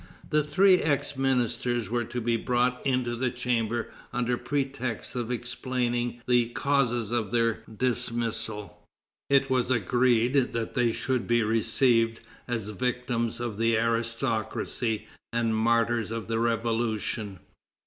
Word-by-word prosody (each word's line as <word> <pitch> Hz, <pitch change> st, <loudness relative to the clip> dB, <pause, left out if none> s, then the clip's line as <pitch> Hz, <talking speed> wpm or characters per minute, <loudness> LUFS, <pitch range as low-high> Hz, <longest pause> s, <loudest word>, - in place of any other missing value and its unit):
The 150 Hz, -, +4 dB
three 185 Hz, +6 st, +5 dB
ex 145 Hz, -2 st, 0 dB
ministers 120 Hz, -3 st, 0 dB
were 120 Hz, -1 st, 0 dB
to 120 Hz, +2 st, -4 dB
be 120 Hz, 0 st, +1 dB
brought 125 Hz, +2 st, 0 dB
into 125 Hz, -3 st, 0 dB
the 125 Hz, +1 st, 0 dB
chamber 120 Hz, -2 st, -1 dB, 0.2 s
under 125 Hz, 0 st, 0 dB
pretext 135 Hz, -4 st, -3 dB
of 120 Hz, -2 st, -2 dB
explaining 120 Hz, -1 st, -2 dB
the 120 Hz, -2 st, +3 dB
causes 120 Hz, -4 st, 0 dB
of 115 Hz, -3 st, 0 dB
their 115 Hz, -1 st, +1 dB, 0.2 s
dismissal. 115 Hz, -4 st, -1 dB, 0.5 s
It 135 Hz, -1 st, +3 dB
was 125 Hz, -2 st, +2 dB
agreed 125 Hz, +2 st, +2 dB
that 115 Hz, -1 st, -3 dB
they 120 Hz, -3 st, +2 dB
should 130 Hz, +1 st, -1 dB
be 120 Hz, -1 st, +3 dB
received 115 Hz, +1 st, +2 dB, 0.3 s
as 115 Hz, -4 st, -2 dB
victims 120 Hz, +1 st, -1 dB
of 115 Hz, -3 st, -4 dB
the 115 Hz, 0 st, +3 dB
aristocracy 115 Hz, -1 st, -1 dB, 0.3 s
and 115 Hz, -1 st, +1 dB
martyrs 115 Hz, 0 st, +2 dB
of 115 Hz, -1 st, -4 dB
the 115 Hz, 0 st, 0 dB
Revolution. 115 Hz, -3 st, -1 dB
120 Hz, 130 wpm, -27 LUFS, 115-125 Hz, 0.5 s, three